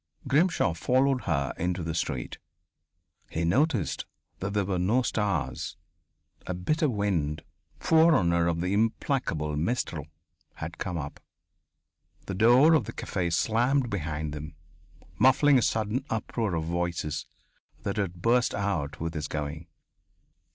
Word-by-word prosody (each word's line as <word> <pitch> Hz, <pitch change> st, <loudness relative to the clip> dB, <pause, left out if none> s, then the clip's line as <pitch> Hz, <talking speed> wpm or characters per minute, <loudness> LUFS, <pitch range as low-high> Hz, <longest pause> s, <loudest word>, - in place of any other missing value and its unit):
Grimshaw 145 Hz, -, +3 dB
followed 130 Hz, -, +1 dB
her 70 Hz, -1 st, 0 dB
into 90 Hz, +1 st, -1 dB
the 80 Hz, 0 st, -3 dB
street. 70 Hz, -5 st, -3 dB, 0.9 s
He 85 Hz, +1 st, -1 dB
noticed 115 Hz, -, +1 dB, 0.3 s
that 95 Hz, +2 st, -3 dB
there 100 Hz, -2 st, +2 dB
were 90 Hz, -1 st, -1 dB
no 110 Hz, +8 st, +2 dB
stars. 80 Hz, -, -2 dB, 0.7 s
A 90 Hz, -, -2 dB
bitter 155 Hz, -, +1 dB
wind, 85 Hz, -, -1 dB, 0.4 s
forerunner 120 Hz, -, +4 dB
of 85 Hz, -1 st, 0 dB
the 90 Hz, +2 st, 0 dB
implacable 110 Hz, -, 0 dB
mistral, 80 Hz, -, -2 dB, 0.5 s
had 85 Hz, +1 st, -7 dB
come 90 Hz, -3 st, -3 dB
up. 70 Hz, -2 st, -6 dB, 1.1 s
The 95 Hz, -, -4 dB
door 120 Hz, -, +6 dB
of 155 Hz, -, +3 dB
the -, -, -7 dB
café 90 Hz, -3 st, -2 dB
slammed 120 Hz, +7 st, +2 dB
behind 75 Hz, -4 st, -3 dB
them, 75 Hz, +1 st, -7 dB, 0.6 s
muffling 135 Hz, +1 st, +5 dB
a -, -, 0 dB
sudden 110 Hz, +4 st, 0 dB
uproar 110 Hz, -3 st, -1 dB
of 80 Hz, -, -1 dB
voices 85 Hz, -2 st, -2 dB, 0.6 s
that 100 Hz, +1 st, -2 dB
had 90 Hz, -3 st, -3 dB
burst 120 Hz, -1 st, +3 dB
out 100 Hz, -8 st, -2 dB
with 80 Hz, 0 st, -3 dB
his 75 Hz, -2 st, -3 dB
going.... 75 Hz, +2 st, -4 dB
90 Hz, 130 wpm, -28 LUFS, 80-120 Hz, 1.1 s, door